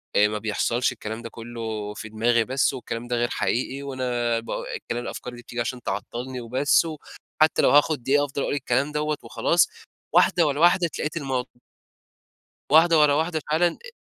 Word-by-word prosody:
آآ 105 - +5
ما 105 0 -3
بيحصلش، 110 +4 0
الكلام 110 -1 -6
ده 115 - -7
كلّه 115 -3 -6
في 110 +1 -8
دماغي 115 +2 +2
بس، 135 +3 +1
والكلام 120 -2 -5
ده 120 - -1
غير 120 0 0
حقيقي، 130 +3 -2
وأنا 125 -4 -1
با 115 - -5
الكلام 120 0 -4
الأفكار 125 0 -6
دي 120 - -11
بتيجي 120 0 -5
عشان 125 +1 -4
تعطّلني 120 +6 -4
وبس، 130 +7 +2
وحتى 155 0 -1
لو - - +4
هاخد 145 -2 +3
دقيقة 145 +2 +3
أفضل 140 0 -4
أقول - - -1
الكلام 135 +1 0
دوّة 150 0 -1
وخلاص - - +2 0.4
واحدة - - +4
ورا 145 0 -1
واحدة 175 +1 +5
اتلقيت 155 0 -4
المو 130 -4 -2 1.3
واحدة 165 +1 +6
ورا 150 -1 +5
واحدة 160 +1 0
فعلًا 160 +3 +3
أ 485 - -10
125 Hz, 175 wpm, -24 LUFS, 115-150 Hz, 1.3 s, واحدة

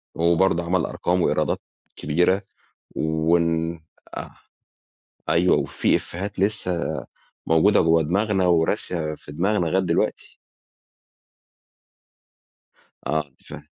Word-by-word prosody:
وبرضه 85 +1 +2
عمل 90 0 +1
أرقام 90 +1 -1
وإيرادات - - +1 0.4
كبيرة 90 +6 +1 0.5
وال 80 +1 +1 0.4
آه، - - -6 1.0
أيوه، - - +4
وفي - - +1
إفيهات 100 +3 -5
لسه 95 -4 0 0.6
موجودة 80 +6 +4
جوّه 80 0 +4
دماغنا 95 +3 +1
وراسية 80 -1 0
في 75 - -13
دماغنا 90 +3 +1
لغاية 95 +4 +1
دلوقتي. 85 -2 -1 2.7
آه 75 -2 -1 0.2
فاهم. - - -9
85 Hz, 90 wpm, -23 LUFS, 80-95 Hz, 2.7 s, أيوه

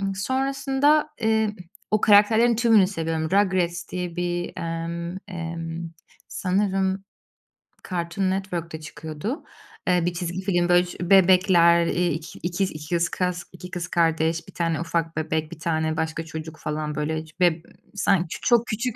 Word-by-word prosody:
sonrasında, 270 +6 +1
eee, 220 -1 +2 0.4
o 215 -1 +2
karakterlerin 220 +3 +5
tümünü 225 -4 +5
seviyorum. 165 -4 -2
Rugrats 185 -3 +1
diye 180 -2 -4
bir, 175 0 -2
emm, 170 +1 -4
emm, 165 -2 -5 0.4
sanırım 190 0 0 0.9
Cartoon 180 +1 -1
Network 180 -4 -3
da 160 - -5
çıkıyordu. 160 - -6 0.4
Eee, 180 -2 +3
bir 175 - 0
çizgi 175 +1 -3
film, 175 -2 +1
böyle, 175 0 +5
ş 175 - -9
bebekler, 180 -3 +6
eee, 175 +1 +1
iki 160 +1 -6
ikiz 185 +2 -1
ikis 170 +3 -1
kız, 180 -1 -2
2 180 0 -10
kız 175 -1 -4
kardeş, 165 -1 +1
1 - - -13
tane 165 -2 -1
ufak 165 -1 -2
bebek, 160 0 -1
1 170 - -9
tane 160 -1 -1
başka 160 0 -2
çocuk, 160 0 -7
falan, 150 0 -3
böyle, 155 +1 -2 0.2
be 175 -2 +3 0.3
sanki 185 -3 +1
çok 240 -1 +3
küçük 235 +2 -2
175 Hz, 140 wpm, -24 LUFS, 165-195 Hz, 0.9 s, bebekler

